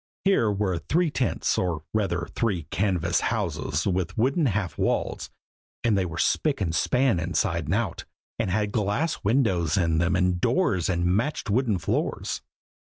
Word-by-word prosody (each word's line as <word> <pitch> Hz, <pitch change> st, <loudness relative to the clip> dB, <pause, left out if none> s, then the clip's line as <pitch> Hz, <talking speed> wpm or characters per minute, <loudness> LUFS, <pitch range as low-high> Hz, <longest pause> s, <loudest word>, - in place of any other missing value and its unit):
Here 155 Hz, -, +3 dB
were 95 Hz, -4 st, -1 dB
three 160 Hz, -, +1 dB
tents, 130 Hz, -4 st, 0 dB
or 85 Hz, -4 st, -1 dB
rather 95 Hz, -6 st, 0 dB
three 100 Hz, -8 st, 0 dB
canvas 90 Hz, -3 st, +1 dB
houses, 75 Hz, +3 st, -1 dB
with 90 Hz, -2 st, -1 dB
wooden 135 Hz, +7 st, +2 dB
half 100 Hz, -4 st, -1 dB
walls; -, -, -1 dB, 0.5 s
and 115 Hz, -3 st, +3 dB
they 95 Hz, -2 st, +1 dB
were 85 Hz, -1 st, -7 dB
spick 145 Hz, -, +1 dB
and 85 Hz, -5 st, -1 dB
span 125 Hz, -, +2 dB
inside 85 Hz, -1 st, -1 dB
and 80 Hz, +7 st, 0 dB
out, 105 Hz, -7 st, -2 dB, 0.3 s
and -, -, 0 dB
had 105 Hz, +2 st, 0 dB
glass 110 Hz, +10 st, -1 dB
windows 100 Hz, -, +2 dB
in 80 Hz, -4 st, +2 dB
them 85 Hz, +2 st, +2 dB
and 90 Hz, -1 st, +1 dB
doors 100 Hz, -, +1 dB
and 85 Hz, -1 st, 0 dB
matched 110 Hz, +6 st, 0 dB
wooden 115 Hz, -3 st, +2 dB
floors. 85 Hz, -, -2 dB
95 Hz, 160 wpm, -26 LUFS, 85-115 Hz, 0.5 s, Here